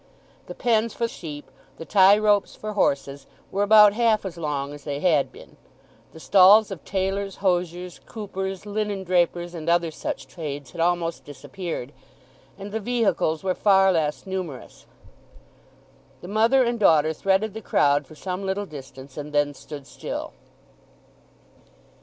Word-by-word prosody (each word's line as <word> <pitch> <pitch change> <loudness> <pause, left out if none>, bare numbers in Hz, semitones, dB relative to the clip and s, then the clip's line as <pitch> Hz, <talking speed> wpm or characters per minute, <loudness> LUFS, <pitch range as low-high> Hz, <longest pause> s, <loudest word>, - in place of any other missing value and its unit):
The - - -8
pens 230 -2 +1
for 235 - 0
sheep, 150 -9 -9 0.3
the 165 - -8
tie 195 +2 +6
ropes 210 -1 +2
for 215 0 -6
horses, 140 -7 -1 0.2
were 195 - -1
about 210 0 +7
half 225 -2 +2
as 185 -3 -5
long 145 -3 -3
as 145 -1 -11
they 145 -1 -4
had 155 -4 +2
been. - - -15 0.5
The 160 - -13
stalls 200 +4 +6
of 190 - -7
tailors, 195 0 -2
hosiers, 180 -1 -2
coopers, 195 -3 -5
linen 205 -1 -3
drapers, 175 -1 0
and 165 -1 -4
other 170 -1 +2
such - - -5
trades 145 -5 -7
had 170 - -5
almost 170 -1 0
disappeared, 145 0 -7 0.7
and 200 +1 -8
the 220 - -2
vehicles 215 -8 0
were 185 -1 +1
far 195 -1 +4
less 155 -2 -1
numerous. 185 -8 -7 1.3
The - - -9
mother 225 +6 +3
and 235 -1 -1
daughter 160 -5 +4
threaded 195 +5 0
the 220 - -7
crowd 145 -6 +2
for 155 - -14
some 185 +4 -5
little 195 +1 -2
distance, 135 -3 -11
and 150 0 -6
then 145 0 +1
stood 145 0 -10
still. - - -6
185 Hz, 150 wpm, -24 LUFS, 155-205 Hz, 1.3 s, about